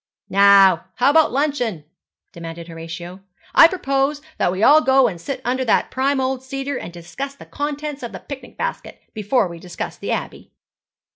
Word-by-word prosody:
'Now, 195 -3 +6
how 255 +3 +3
about 320 +1 +4
luncheon?' 250 - -1 0.5
demanded 165 0 -8
Horatio. 170 +2 -8 0.3
'I 330 - +9
propose 275 -4 -1 0.2
that - - +2
we 190 +3 -2
all 305 +5 +7
go 265 -2 +4
and 175 -6 -6
sit 275 +3 -5
under 255 +2 0
that 225 - +1
prime 270 +1 0
old 260 0 -1
cedar 270 +1 -4
and - - -8
discuss 220 +12 -7
the - - -13
contents 295 0 -4
of 240 - -6
the - - -7
picnic 280 -2 -10
basket - - -5
before 215 0 +1
we 170 -1 -9
discuss 175 0 -7
the - - -6
Abbey.' - - -5
255 Hz, 170 wpm, -20 LUFS, 180-280 Hz, 0.5 s, I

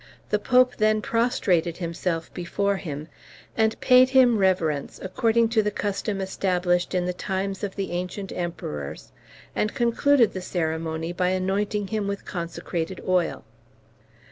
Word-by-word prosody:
The 210 - +3
Pope 250 +2 +3
then 215 0 +3
prostrated 210 -8 +1
himself 170 -1 -3
before 200 +3 -1
him, 150 -4 -6 0.5
and 220 0 +1
paid 255 0 +6
him 255 -4 +5
reverence, 165 -7 +1
according 225 +4 +1
to 225 -1 +3
the 210 - 0
custom 205 0 -2
established 180 -2 0
in 180 -1 +1
the 180 - -1
times 195 +2 -3
of 200 -2 -3
the 195 -1 -3
ancient 180 +2 -4
Emperors, 75 - -5 0.4
and 215 - -1
concluded 240 0 +3
the 185 - -4
ceremony 160 -1 -2
by 180 0 +1
anointing 195 +2 -1
him 215 -2 -1
with 200 0 -4
consecrated 170 0 -4
oil. 180 -2 +1
190 Hz, 140 wpm, -25 LUFS, 175-215 Hz, 0.5 s, paid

